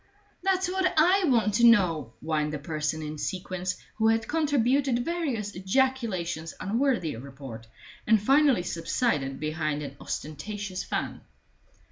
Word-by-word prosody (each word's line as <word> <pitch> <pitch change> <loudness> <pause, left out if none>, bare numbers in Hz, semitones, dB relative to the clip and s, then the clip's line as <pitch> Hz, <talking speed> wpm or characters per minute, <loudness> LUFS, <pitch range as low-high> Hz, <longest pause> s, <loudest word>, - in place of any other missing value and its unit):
"That's 375 0 +1
what 370 0 +1
I 365 +5 +5
want 230 -7 +3
to 235 - +2
know," 175 - +4
whined 155 -1 -1
the - - -1
person 155 +1 -3
in 150 0 -6
sequins, 185 +4 -3 0.2
who 220 0 +3
had 225 0 +2
contributed 275 -4 +1
various 275 -12 -2
ejaculations 190 -6 -1
unworthy 230 - 0
of 115 - -8
report, 135 -4 -9 0.4
and 220 0 +5
finally 270 -1 +4
subsided 165 - -1
behind 155 -1 -2
an 140 -1 -8
ostentatious 190 +5 -5
fan. - - -3
195 Hz, 130 wpm, -27 LUFS, -, 0.4 s, I